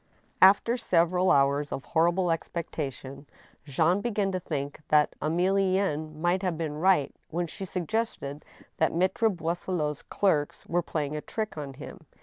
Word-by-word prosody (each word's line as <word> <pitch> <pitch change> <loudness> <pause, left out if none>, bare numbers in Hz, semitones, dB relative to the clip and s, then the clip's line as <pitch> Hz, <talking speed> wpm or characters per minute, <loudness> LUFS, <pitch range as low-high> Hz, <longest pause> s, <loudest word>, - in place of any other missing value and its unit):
After 205 +5 +6
several 180 -3 +2
hours 140 +1 +3
of 135 - -4
horrible 170 +2 +2
expectation, 145 -4 -5 0.4
Jean 160 +7 +2
began 205 -4 0
to 185 - -1
think 145 -4 -4
that 150 -1 +3
Emilienne 180 -2 +1
might 175 +4 +1
have 180 -4 -1
been 155 -2 -3
right 180 -5 +3 0.2
when 170 +2 -1
she 195 +4 -7
suggested 180 -6 -3 0.3
that 160 - +2
Maltre 190 +6 +2
Boisselot's 170 -4 -2
clerks 155 -8 0
were 175 +1 0
playing 155 -3 -3
a 150 - -3
trick 215 +5 -4
on 140 -3 -6
him. 160 +3 -11
170 Hz, 140 wpm, -28 LUFS, 150-190 Hz, 0.4 s, After